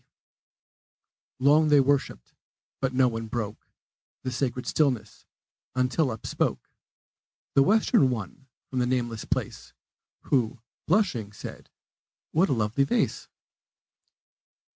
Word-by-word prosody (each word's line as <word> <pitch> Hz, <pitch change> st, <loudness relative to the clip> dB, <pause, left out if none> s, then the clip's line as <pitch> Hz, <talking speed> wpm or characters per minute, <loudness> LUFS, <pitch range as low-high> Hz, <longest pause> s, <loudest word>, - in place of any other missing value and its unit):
Long 150 Hz, +4 st, +4 dB
they 150 Hz, -1 st, +6 dB
worshiped; 135 Hz, -, 0 dB, 0.5 s
but 135 Hz, -1 st, 0 dB
no 130 Hz, 0 st, +4 dB
one 115 Hz, -1 st, -3 dB
broke 110 Hz, -2 st, -5 dB, 0.6 s
The 130 Hz, -, -2 dB
sacred 125 Hz, 0 st, -2 dB
stillness, 125 Hz, -9 st, -1 dB, 0.5 s
until 130 Hz, +3 st, +1 dB
up 110 Hz, -2 st, -6 dB
spoke -, -, -2 dB, 0.8 s
The 140 Hz, -, +5 dB
Western 210 Hz, -, +4 dB
one 125 Hz, +3 st, -5 dB, 0.2 s
from 130 Hz, -, -3 dB
the 125 Hz, -, +1 dB
nameless 120 Hz, -3 st, -1 dB
place, -, -, -4 dB, 0.5 s
Who, 125 Hz, -2 st, 0 dB, 0.3 s
blushing, 155 Hz, -, +1 dB
said, -, -, -9 dB, 0.6 s
"What 170 Hz, +4 st, +3 dB
a -, -, +3 dB
lovely 115 Hz, +3 st, +1 dB
vase!" 235 Hz, -, 0 dB
130 Hz, 110 wpm, -27 LUFS, 115-140 Hz, 0.8 s, they